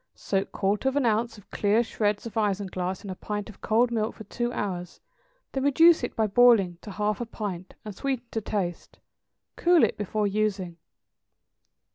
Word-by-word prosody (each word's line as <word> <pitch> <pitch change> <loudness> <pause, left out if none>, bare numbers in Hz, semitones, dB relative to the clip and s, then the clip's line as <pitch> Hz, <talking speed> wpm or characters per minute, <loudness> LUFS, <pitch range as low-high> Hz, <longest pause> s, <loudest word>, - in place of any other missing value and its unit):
= - - -53
Soak 195 -1 -2
quarter 205 +6 0
of 265 - -5
an 285 -3 +2
ounce 225 0 +1
of 205 - -18
clear 210 +3 +2
shreds 210 -2 -1
of 230 - -6
isinglass 190 -4 -1
in 200 - -6
a - - -5
pint 205 +2 -5
of 195 - -21
cold 235 +2 +2
milk 220 -1 -1
for 220 - -9
two 240 +4 -3
hours; 180 -6 -4 0.5
then 270 - -2
reduce 325 +3 +5
it 245 - -3
by 220 - +2
boiling 205 -5 +4
to - - -9
half 210 +2 -1
a - - -1
pint, 190 -5 -6
and 210 - -6
sweeten 265 -1 -2
to 225 - -2
taste. 190 -4 -4 0.6
Cool 345 -2 +5
it - - +2
before 210 +1 -1
using. 200 -4 -1
210 Hz, 185 wpm, -27 LUFS, 195-235 Hz, 0.6 s, reduce